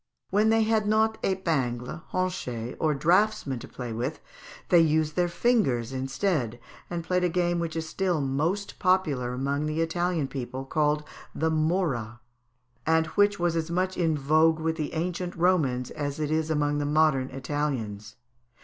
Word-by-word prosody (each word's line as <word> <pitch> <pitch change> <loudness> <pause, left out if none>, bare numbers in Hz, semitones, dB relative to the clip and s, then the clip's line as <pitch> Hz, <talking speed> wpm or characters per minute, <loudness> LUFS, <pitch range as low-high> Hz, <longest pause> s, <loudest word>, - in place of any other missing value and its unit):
When 210 +3 +3
they 225 0 +4
had 215 -1 +1
not 220 +1 +2
épingles, 155 -7 -1
honchets, 125 -11 -2
or 155 -2 +2
draughtsmen 170 - +2
to - - -9
play 120 -3 -6
with, 125 +7 -3 0.5
they 175 - +6
used 155 -1 +2
their 175 -1 +2
fingers 170 - +1
instead, 130 - -1 0.3
and 170 -1 -3
played 180 +2 0
a 180 - +3
game 175 0 +1
which 165 -2 -3
is 160 -1 -3
still 180 -1 0
most 155 +9 -1
popular 170 -10 +1
amongst 140 +3 -1
the 155 +1 -2
Italian 165 -2 0
people, 130 0 -5
called 150 +1 +1 0.3
the 160 0 +1
morra, 155 - 0 0.6
and 160 0 +3
which 205 0 +4
was 175 -1 0
as 165 0 -1
much 185 +2 0
in 165 -3 +1
vogue 155 +3 +3
with 160 0 -1
the 155 0 -4
ancient 175 +2 -2
Romans 155 -9 +1
as 145 0 -4
it 150 -1 -1
is 160 0 0
among 145 -1 +1
the 145 - -1
modern 145 -3 +2
Italians. 125 -7 -3
155 Hz, 160 wpm, -27 LUFS, 135-180 Hz, 0.6 s, they